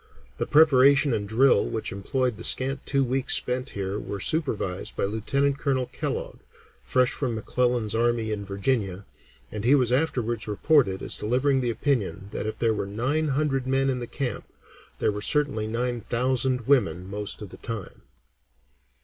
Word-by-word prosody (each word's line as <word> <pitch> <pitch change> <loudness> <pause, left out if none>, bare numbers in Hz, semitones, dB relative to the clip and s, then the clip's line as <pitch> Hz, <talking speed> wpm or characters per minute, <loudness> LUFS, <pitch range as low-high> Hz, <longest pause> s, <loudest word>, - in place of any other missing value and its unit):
The - - -1
preparation 140 -2 +5
and 105 -2 -3
drill 120 0 +3
which 110 - -3
employed 125 +4 -2
the - - -8
scant 135 +1 +3
two 135 -1 +2
weeks 130 +1 +2
spent 125 +2 -2
here 100 +1 -3
were 100 - -6
supervised 105 - -1
by - - -2
Lieutenant 135 +8 0
Colonel 130 -3 0
Kellogg, - - -5 0.4
fresh 130 -1 +2
from 125 -5 -2
McClellan's 120 0 0
army 115 -1 0
in 105 -1 -3
Virginia, 100 -1 -2 0.5
and 105 - -5
he 130 +5 +5
was 125 -4 +2
afterwards 125 -5 0
reported 105 -2 +2
as - - +1
delivering 130 +4 +1
the 120 - -1
opinion 110 - -2
that - - -4
if 110 - -4
there 115 -1 +1
were 100 -2 -3
nine 130 +10 -1
hundred 135 -2 -1
men 135 +1 +1
in 125 - -3
the 120 - -5
camp, 125 -5 -4 0.5
there - - +1
were 105 0 -5
certainly 140 -4 +2
nine 120 +1 -2
thousand 125 +2 0
women 110 - +1
most 105 +1 -3
of 100 - -9
the - - -11
time. 115 -5 -7
125 Hz, 165 wpm, -25 LUFS, 105-135 Hz, 0.5 s, preparation